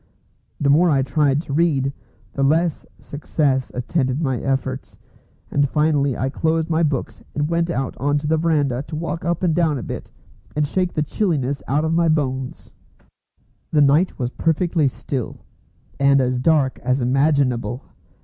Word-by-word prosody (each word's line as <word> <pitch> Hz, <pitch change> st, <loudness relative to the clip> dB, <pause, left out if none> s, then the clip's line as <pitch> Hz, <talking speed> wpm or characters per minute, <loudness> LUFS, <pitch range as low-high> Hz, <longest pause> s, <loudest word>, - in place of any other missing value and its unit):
The 140 Hz, -1 st, +3 dB
more 170 Hz, +5 st, +5 dB
I 135 Hz, -3 st, +3 dB
tried 140 Hz, +2 st, +1 dB
to 140 Hz, -, -6 dB
read, 140 Hz, -4 st, +1 dB, 0.4 s
the 140 Hz, -, -3 dB
less 160 Hz, +3 st, +1 dB
success 140 Hz, -2 st, -1 dB
attended 130 Hz, +1 st, -1 dB
my 135 Hz, -6 st, -1 dB
efforts; 135 Hz, -1 st, -3 dB, 0.5 s
and 145 Hz, -1 st, +2 dB
finally 150 Hz, -3 st, +1 dB
I 130 Hz, -, -1 dB
closed 160 Hz, +2 st, 0 dB
my 160 Hz, +1 st, +2 dB
books 145 Hz, -5 st, -2 dB
and 145 Hz, 0 st, 0 dB
went 170 Hz, 0 st, +1 dB
out 135 Hz, -6 st, -2 dB
on 145 Hz, +2 st, +1 dB
the 150 Hz, +2 st, 0 dB
verandah 150 Hz, -6 st, +1 dB
to -, -, -6 dB
walk 165 Hz, +2 st, -4 dB
up 170 Hz, +1 st, -1 dB
and 170 Hz, -3 st, +2 dB
down 160 Hz, -3 st, +1 dB
a 120 Hz, -, -5 dB
bit, -, -, -6 dB, 0.5 s
and 150 Hz, 0 st, +2 dB
shake 180 Hz, +4 st, -1 dB
the 150 Hz, -, 0 dB
chilliness 145 Hz, -6 st, -1 dB
out 145 Hz, +4 st, +1 dB
of 160 Hz, -, 0 dB
my 170 Hz, 0 st, +3 dB
bones. 135 Hz, -4 st, -2 dB, 1.0 s
The 150 Hz, -, +3 dB
night 145 Hz, +6 st, +3 dB
was 125 Hz, -2 st, -2 dB
perfectly 165 Hz, 0 st, +1 dB
still, 130 Hz, -1 st, -5 dB, 0.5 s
and 140 Hz, 0 st, +4 dB
as 125 Hz, -1 st, 0 dB
dark 140 Hz, -1 st, +2 dB
as 130 Hz, +2 st, 0 dB
imaginable. 130 Hz, -1 st, +1 dB
145 Hz, 160 wpm, -21 LUFS, 135-160 Hz, 1.0 s, more